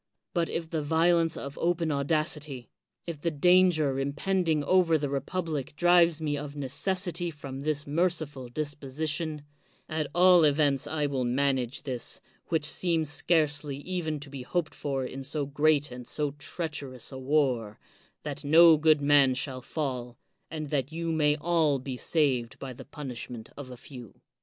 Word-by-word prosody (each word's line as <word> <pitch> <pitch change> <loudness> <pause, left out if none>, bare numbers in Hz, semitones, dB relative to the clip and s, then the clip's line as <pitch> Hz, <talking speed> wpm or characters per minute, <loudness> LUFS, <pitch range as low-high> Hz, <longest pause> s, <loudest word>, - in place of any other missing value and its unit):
But 170 -3 0
if 165 -1 -3
the 160 -1 -2
violence 165 +2 +2
of 140 0 -7
open 170 -1 +1
audac 155 +2 +1
ity, 140 -6 -9 0.3
if 165 -4 -6 0.2
danger 175 -6 +4
impending 155 +3 0
over 175 -1 +4
the 145 -2 -3
republic 150 0 -3
drives 175 -1 +4
me 150 -2 -1
of 145 0 -6
necessity 175 +5 -2
from 140 -4 -8
this 150 +1 -1
merciful 150 -5 -1
disposition, 150 +2 -3 0.4
at 155 -1 -2
all 180 -1 +6
events 145 -2 +2
I 150 0 -1
will 135 -3 -1
manage 130 0 0
this, 125 -4 -3 0.3
which 160 -3 0
seems 160 -1 0
scarcely 145 -3 0
even 160 -1 -3
to 145 -2 -8
be 140 -2 -6
hoped 165 +6 -2
for 135 -2 -3
in 135 +1 -6
so 145 +1 -1
great 145 0 +2
and 125 -1 -8
so 150 -2 -1
treacherous 145 -4 -4
a 130 - -7
war, 130 -6 0 0.5
that - - -6
no 160 +2 +7
good 155 -1 +4
man 140 -2 +5
shall 130 -1 -3
fall, 125 -4 -4 0.3
and 155 -2 -6
that 140 -1 -1
you 165 +1 -3
may 150 -2 +2
all 155 -2 +2
be 130 0 -5
saved 130 -4 0
by 130 -2 -7
the - - -11
punishment 125 -6 -7
of 140 -2 -8
a 125 - -9
few. 120 -4 -12
150 Hz, 155 wpm, -28 LUFS, 135-160 Hz, 0.5 s, no